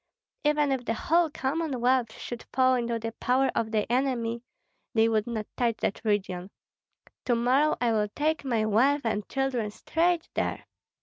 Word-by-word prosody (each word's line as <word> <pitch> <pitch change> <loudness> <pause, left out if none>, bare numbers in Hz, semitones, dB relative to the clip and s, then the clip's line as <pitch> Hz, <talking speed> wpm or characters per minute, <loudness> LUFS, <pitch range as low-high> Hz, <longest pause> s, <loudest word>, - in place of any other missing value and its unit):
Even 295 -1 +2
if 265 -2 -1
the 230 -1 -1
whole 335 +6 +2
Commonwealth 260 -5 0
should 240 -1 -7
fall 260 0 +4
into 235 -2 0
the 225 0 -4
power 260 +2 +2
of 225 - -1
the 215 -1 0
enemy, 240 -3 0 0.5
they 225 0 +5
would 220 -1 +1
not 220 -3 -3
touch 235 -3 0
that 195 - -2
region. 195 -4 -1 0.8
To 245 - +2
morrow 260 +6 +2
I 240 -2 +2
will 210 -2 +1
take 310 +1 0
my 230 -5 0
wife 260 +7 +3
and 210 -3 -2
children 270 -5 -1
straight 335 +9 0
there." - - -2
245 Hz, 165 wpm, -27 LUFS, 225-270 Hz, 0.8 s, they